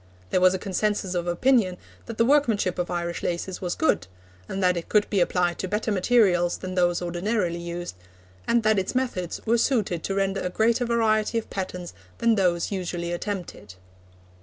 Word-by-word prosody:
There 185 Hz, -, +2 dB
was 185 Hz, 0 st, +5 dB
a -, -, 0 dB
consensus 195 Hz, 0 st, -1 dB
of 175 Hz, -1 st, -2 dB
opinion 185 Hz, 0 st, +2 dB, 0.3 s
that 230 Hz, -2 st, -6 dB
the 230 Hz, -, +4 dB
workmanship 230 Hz, -10 st, +2 dB
of 180 Hz, -, -1 dB
Irish 170 Hz, -1 st, -3 dB
laces 180 Hz, +2 st, -3 dB
was 180 Hz, -2 st, -2 dB
good, 315 Hz, -, +1 dB, 0.4 s
and 190 Hz, 0 st, -2 dB
that 180 Hz, 0 st, +3 dB
it 170 Hz, -, -5 dB
could 210 Hz, -1 st, +3 dB
be 200 Hz, -, +2 dB
applied 175 Hz, -1 st, +1 dB
to 190 Hz, -, -2 dB
better 210 Hz, +3 st, -1 dB
materials 185 Hz, -4 st, +3 dB
than 185 Hz, 0 st, -6 dB
those 175 Hz, -1 st, +1 dB
ordinarily 175 Hz, 0 st, -1 dB
used, 175 Hz, 0 st, -5 dB, 0.5 s
and 235 Hz, -1 st, +3 dB
that 215 Hz, -2 st, +3 dB
its 190 Hz, -, -3 dB
methods 235 Hz, -10 st, -2 dB
were 230 Hz, +1 st, +3 dB
suited 210 Hz, -, +1 dB
to 195 Hz, -, -2 dB
render 195 Hz, 0 st, 0 dB
a 180 Hz, -, -2 dB
greater 230 Hz, +5 st, +2 dB
variety 225 Hz, -1 st, +1 dB
of 225 Hz, -, -4 dB
patterns 180 Hz, -2 st, -5 dB, 0.2 s
than 230 Hz, -1 st, +3 dB
those 180 Hz, -4 st, +1 dB
usually 175 Hz, -3 st, -3 dB
attempted. 175 Hz, -, -5 dB
190 Hz, 185 wpm, -25 LUFS, 175-220 Hz, 0.5 s, was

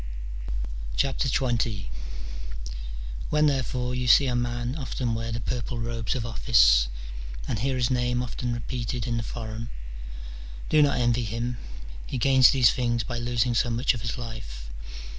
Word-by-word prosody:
XX. 120 Hz, -6 st, +1 dB, 1.4 s
When, 150 Hz, 0 st, +4 dB
therefore, 130 Hz, -3 st, 0 dB
you 125 Hz, 0 st, -1 dB
see 140 Hz, +4 st, +7 dB
a 125 Hz, -2 st, +1 dB
man 120 Hz, +1 st, -1 dB
often 125 Hz, -4 st, -2 dB
wear 115 Hz, +1 st, -2 dB
the 115 Hz, -, -2 dB
purple 120 Hz, +2 st, -2 dB
robes 115 Hz, -1 st, -2 dB
of 120 Hz, -3 st, -2 dB
office, -, -, +5 dB, 0.6 s
and 110 Hz, -, -1 dB
hear 130 Hz, +4 st, +1 dB
his 125 Hz, -1 st, +1 dB
name 125 Hz, 0 st, +1 dB
often 125 Hz, 0 st, -3 dB
repeated 120 Hz, 0 st, -3 dB
in 120 Hz, -2 st, 0 dB
the -, -, 0 dB
forum, 115 Hz, 0 st, -5 dB, 1.0 s
do 155 Hz, -, +6 dB
not 145 Hz, -1 st, +4 dB
envy 120 Hz, -1 st, +2 dB
him: 115 Hz, +3 st, -2 dB, 0.5 s
he -, -, -3 dB
gains 130 Hz, +1 st, +7 dB
these 130 Hz, -6 st, +6 dB
things 120 Hz, -2 st, 0 dB
by 120 Hz, -2 st, -3 dB
losing 120 Hz, 0 st, +1 dB
so 120 Hz, +1 st, +2 dB
much 120 Hz, +4 st, +2 dB
of 120 Hz, -, -5 dB
his 115 Hz, +2 st, -3 dB
life. 110 Hz, -, -7 dB
120 Hz, 150 wpm, -27 LUFS, 115-125 Hz, 1.4 s, see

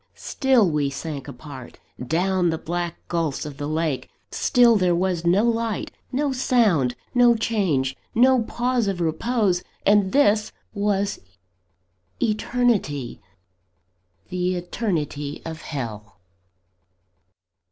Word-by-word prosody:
Still 260 Hz, -7 st, +2 dB
we 150 Hz, -3 st, 0 dB
sank 140 Hz, 0 st, -6 dB
apart, 130 Hz, -1 st, -10 dB, 0.3 s
down 180 Hz, +5 st, +1 dB
the 160 Hz, -, -1 dB
black 175 Hz, +1 st, -3 dB
gulphs 165 Hz, -5 st, -1 dB
of 145 Hz, -2 st, -8 dB
the 145 Hz, 0 st, -4 dB
lake; 155 Hz, -3 st, -2 dB, 0.2 s
still 240 Hz, -2 st, +4 dB
there 180 Hz, -4 st, +2 dB
was 175 Hz, -1 st, -1 dB
no 190 Hz, +5 st, +4 dB
light, 230 Hz, -2 st, -1 dB, 0.2 s
no 280 Hz, +1 st, 0 dB
sound, 210 Hz, -, +2 dB, 0.2 s
no 245 Hz, -1 st, +5 dB
change, 185 Hz, -, 0 dB, 0.2 s
no 255 Hz, +2 st, +5 dB
pause 240 Hz, 0 st, 0 dB
of 195 Hz, -3 st, -2 dB
repose 180 Hz, +3 st, +1 dB, 0.2 s
and 200 Hz, -2 st, +4 dB
this 215 Hz, -7 st, +3 dB, 0.2 s
was 200 Hz, -1 st, 0 dB, 1.0 s
eternity: 215 Hz, -, 0 dB, 1.1 s
the 180 Hz, 0 st, -1 dB
eternity 165 Hz, -6 st, -3 dB
of 160 Hz, -1 st, -6 dB
Hell! 110 Hz, -8 st, -6 dB
180 Hz, 110 wpm, -23 LUFS, 155-225 Hz, 1.1 s, no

